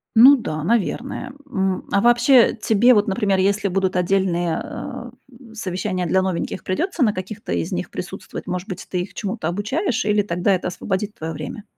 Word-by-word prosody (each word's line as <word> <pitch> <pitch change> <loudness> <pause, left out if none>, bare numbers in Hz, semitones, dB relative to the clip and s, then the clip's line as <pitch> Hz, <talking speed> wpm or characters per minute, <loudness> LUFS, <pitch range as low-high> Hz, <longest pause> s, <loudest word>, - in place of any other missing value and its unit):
Ну 260 +5 +9
да, 155 - -4
наверное. 235 - -1 0.2
М. 190 -6 -1
А 200 - +3
вообще, 240 +2 +5
тебе 225 +2 +4
вот, 210 -2 +3
например, 200 -2 +1
если 200 +1 +1
будут 190 0 0
отдельные, 180 -2 +1
э, - - -7 0.4
в - - -15
совещания 185 -3 -2
для 190 +3 +2
новеньких, 185 0 -3
придётся 340 - -2
на 215 -4 +3
каких-то 185 - -5
из 85 -1 -2
них - - -3
присутствовать? - - -7
Может 180 +2 -3
быть, 185 -5 -6
ты 180 - -1
их 180 - -7
чему-то 205 -5 -3
обучаешь, 230 - -1
или 210 0 +3
тогда 185 0 +1
это 185 - -1
освободит 195 +3 -3
твоё 160 +1 -5
время? 155 +8 -7
195 Hz, 180 wpm, -21 LUFS, 180-225 Hz, 0.4 s, Ну